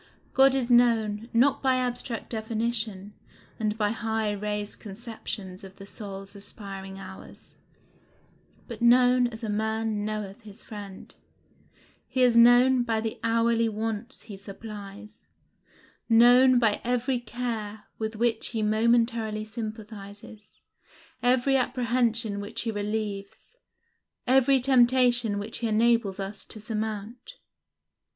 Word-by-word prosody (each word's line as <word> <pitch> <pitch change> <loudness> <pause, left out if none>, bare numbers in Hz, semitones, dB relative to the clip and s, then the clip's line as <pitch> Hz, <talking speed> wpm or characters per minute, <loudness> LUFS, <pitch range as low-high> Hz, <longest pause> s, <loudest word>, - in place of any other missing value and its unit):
God 270 0 +5
is 255 -2 -1
known, 230 -2 +3
not 265 +4 +3
by 260 -1 +3
abstract 245 -2 -3
definition, 220 -3 -2 0.5
and 215 -1 -1
by 210 -2 +1
high 220 -1 -1
raised 210 0 -4
conceptions 205 -3 -7
of 190 0 -11
the 195 - -11
soul's 195 -1 -8
aspiring 195 -1 -8
hours, 190 0 -12 1.1
but 235 -3 -8
known 250 +1 +5
as 225 -1 -9
a - - -2
man 220 0 -1
knoweth 210 0 -5
his 210 -2 -12
friend; 205 -3 -10 0.9
he 255 - +1
is 245 -2 +4
known 245 +2 +6
by 230 -2 0
the 220 0 -4
hourly 230 0 +2
wants 220 +3 -4
he 215 -2 -9
supplies; 205 +1 -10 0.9
known 245 +3 +6
by 225 -4 +2
every 245 +1 0
care 225 -3 -5 0.2
with 220 0 -3
which 230 0 0
he 225 -2 -2
momentarily 220 0 +1
sympathizes, 215 -1 -9 0.6
every 255 +2 +3
apprehension 240 -4 0
which 205 0 -5
he 225 - -2
relieves, 205 - -5 0.7
every 265 +1 +4
temptation 245 -3 +3
which 205 +3 -5
he 230 - -1
enables 220 -2 +2
us 195 +2 -5
to 220 - -7
surmount. 220 - -5
225 Hz, 120 wpm, -27 LUFS, 210-240 Hz, 1.1 s, known